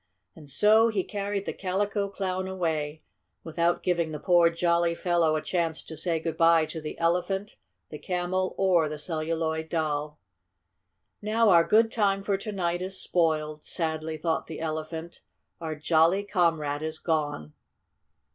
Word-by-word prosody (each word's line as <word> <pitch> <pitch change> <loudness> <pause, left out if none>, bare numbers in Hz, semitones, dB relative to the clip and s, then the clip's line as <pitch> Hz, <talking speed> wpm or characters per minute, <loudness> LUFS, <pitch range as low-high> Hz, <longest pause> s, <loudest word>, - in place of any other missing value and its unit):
And 150 -3 -13
so 215 - +5
he 210 -5 0
carried 200 0 -3
the - - -3
Calico 200 +2 -1
Clown 185 -1 -3
away, 160 -5 -2 0.4
without 170 +1 0
giving 170 -3 0
the 150 - -5
poor, 175 0 +4
jolly 170 0 +1
fellow 170 -3 +1
a 155 - -2
chance 165 -3 -1
to 160 - -9
say 165 +1 -1
good 165 0 -4
bye 165 -1 +5
to 160 +1 -7
the 155 - -6
Elephant, 180 +4 -1 0.3
the 150 - -8
Camel 185 +1 -2
or 175 -5 +3
the 155 - -5
Celluloid 160 0 -2
Doll. 150 -2 -2 1.0
"Now 220 +1 +2
our 170 -3 +7
good 225 +5 +3
time 195 -3 +1
for 200 0 +1
to 205 +3 -5
night 175 -3 -1
is 190 +1 -4
spoiled," 155 -3 0
sadly 160 -2 -3
thought 160 +1 -1
the 160 - -7
Elephant. 160 +1 -5 0.4
"Our 160 -2 -4
jolly 165 +5 +3
comrade 165 -7 0
is 155 0 -4
gone!" 145 - -2
170 Hz, 155 wpm, -27 LUFS, 155-185 Hz, 1.0 s, our